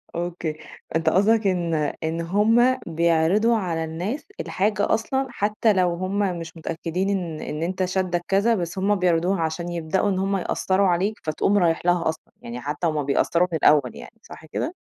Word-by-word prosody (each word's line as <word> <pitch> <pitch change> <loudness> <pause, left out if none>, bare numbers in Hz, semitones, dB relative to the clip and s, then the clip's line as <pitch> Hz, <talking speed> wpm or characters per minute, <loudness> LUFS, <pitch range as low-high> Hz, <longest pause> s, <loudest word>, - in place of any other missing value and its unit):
أوكي 170 -2 -3 0.4
أنت 160 0 +2
قصدك 205 +5 +3
إن 175 -3 0 0.3
إن 160 +1 -2
هُم 225 +8 +3
بيعرضوا 170 +7 +2
على 170 -5 -2
الناس 180 - -4
الحاجة 205 - 0
أصلًا 265 +4 0
حتى 215 -1 +1
لو 180 -2 +2
هُم 185 +3 -2 0.2
مش 165 +1 -9
متأكدين 170 +4 -3
إن 175 -6 -2
إن 150 +2 -4
أنت 185 +2 -1
شادك 180 -1 -1
كذا، 200 +4 +3
بس 180 -1 -4
هُم 200 +2 +2
بيعرضوها 180 0 +1
عشان 165 +2 -2
يبدأوا 175 +4 0
إن 190 -2 0
هُم 195 +1 0
يأثّروا 190 +1 +1
عليك، 185 +4 0
فتقوم 160 +6 +1
رايح 170 -3 +1
لها 175 -2 +2
أصلًا، 160 - -7
يعني 120 +1 -7
حتى 145 +5 -2
هُم 155 -2 -1
بيأثّروا 170 +5 +2
في 170 - -4
الأول 150 -5 +4
يعني - - -12
صح - - -12
كده؟ - - -4
180 Hz, 175 wpm, -23 LUFS, 165-200 Hz, 0.4 s, الأول